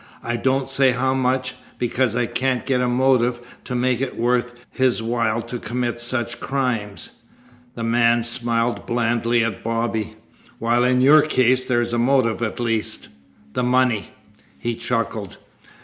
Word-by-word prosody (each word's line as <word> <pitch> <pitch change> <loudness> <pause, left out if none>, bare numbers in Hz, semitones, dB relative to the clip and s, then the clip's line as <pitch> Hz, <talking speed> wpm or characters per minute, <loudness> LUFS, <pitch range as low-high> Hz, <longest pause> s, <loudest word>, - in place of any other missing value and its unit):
"I 120 - -2
don't 130 +2 0
say 135 -1 +3
how 130 +1 0
much, 130 0 0 0.2
because 120 -1 0
I 120 0 +1
can't 125 +1 -1
get 130 -2 +1
a 125 - +1
motive 125 -1 +2 0.3
to 125 - -4
make 125 0 +1
it 135 - -3
worth 120 +1 0 0.2
his 130 -3 +1
while 115 -1 0
to 120 +1 -6
commit 120 0 -3
such 120 0 -1
crimes." 125 -7 -2 0.6
The 115 - -5
man 115 0 +3
smiled 120 0 0
blandly 120 0 +1
at 115 - -3
Bobby. 115 -1 -2 0.4
"While 120 +1 +1
in 125 0 +3
your 150 +4 +7
case 130 -3 +2
there's 120 -1 0
a 120 - +1
motive 120 -2 +2
at 115 0 -3
least 115 -2 -2 0.4
the - - -1
money." 125 -3 +2 0.5
He 120 - -2
chuckled. 115 -4 -3
120 Hz, 150 wpm, -21 LUFS, 115-130 Hz, 0.6 s, your